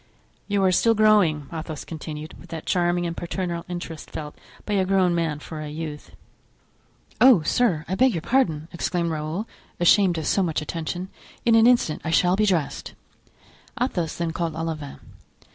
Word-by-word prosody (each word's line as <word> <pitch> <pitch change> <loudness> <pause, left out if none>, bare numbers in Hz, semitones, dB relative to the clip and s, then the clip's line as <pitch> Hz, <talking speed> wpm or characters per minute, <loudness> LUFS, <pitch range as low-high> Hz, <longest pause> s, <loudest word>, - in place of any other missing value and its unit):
"You 200 -1 +1
are 190 - +4
still 225 +5 +3
growing," 205 -9 +4
Athos 160 -1 -6
continued, 155 -1 -7
with - - -15
that 160 -1 -6
charming 175 0 +1
and 170 -1 -3
paternal 175 -1 -4
interest 175 -3 -6
felt 150 -1 -7 0.3
by 210 - -2
a 195 -2 +3
grown 185 -2 +2
man 165 -3 0
for 155 +1 -8
a 150 - -5
youth. 150 -1 -7 1.1
"Oh, 245 -10 +7
sir, 175 -7 +1
I 180 - -3
beg 260 +6 +4
your 165 - -3
pardon!" 165 - +1
exclaimed 170 0 -1
Raoul, 160 +7 -3 0.3
ashamed 175 0 +4
of 160 - -3
so 195 - +2
much 165 -4 0
attention; 170 +4 -4 0.4
"in 235 - +4
an 225 +1 +6
instant 240 -11 +2
I - - -3
shall 180 +2 +3
be 210 +1 +2
dressed." 170 -7 -1 0.8
Athos 180 - -1
then 170 -1 -2
called 165 -1 -3
Olivain. 160 -3 -4
170 Hz, 170 wpm, -24 LUFS, 160-195 Hz, 1.1 s, Oh